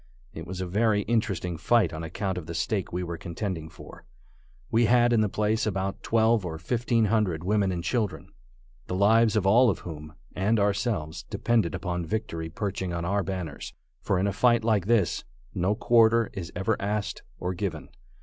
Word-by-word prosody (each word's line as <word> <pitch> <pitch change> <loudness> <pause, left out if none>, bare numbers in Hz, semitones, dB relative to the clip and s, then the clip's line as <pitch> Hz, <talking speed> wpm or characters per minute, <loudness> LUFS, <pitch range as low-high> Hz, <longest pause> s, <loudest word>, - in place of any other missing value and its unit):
It 80 +2 -8
was 95 +1 -5
a - - -2
very 105 +3 +1
interesting 100 -6 -1
fight 100 0 +2
on 80 - -5
account 90 +3 -3
of 80 - -11
the 85 - -5
stake 95 +3 -1
we 90 +1 -2
were 85 -1 -5
contending 85 -2 -4
for. - - -13 0.7
We 115 +1 +4
had 120 +1 +4
in 115 - +4
the 105 - +1
place 110 +2 0
about 95 -1 -2
twelve 115 -1 +2
or 80 -3 -4
fifteen 115 +5 +1
hundred 95 -7 +1
women 100 0 +1
and 85 -2 -3
children, 110 -2 -2 0.6
the 90 - -3
lives 110 +3 +4
of 105 -3 +1
all 120 +6 +6
of 95 - 0
whom, 75 -2 -9 0.2
and 105 +5 +2
of 100 - +3
ourselves, 100 -6 -1
depended 115 -9 +1
upon 90 -2 -3
victory 85 -5 -3
perching 95 +1 -3
on 85 0 -3
our 100 +3 +1
banners; 90 -6 -5 0.3
for 95 - 0
in 95 - +1
a 100 - 0
fight 120 +1 +3
like 105 -4 +1
this, 110 -6 +2 0.3
no 95 +4 +1
quarter 115 0 +4
is 90 -4 -6
ever 95 +5 0
asked 105 0 -2 0.2
or 90 +1 -3
given. 90 -4 -4
100 Hz, 190 wpm, -27 LUFS, 90-110 Hz, 0.7 s, all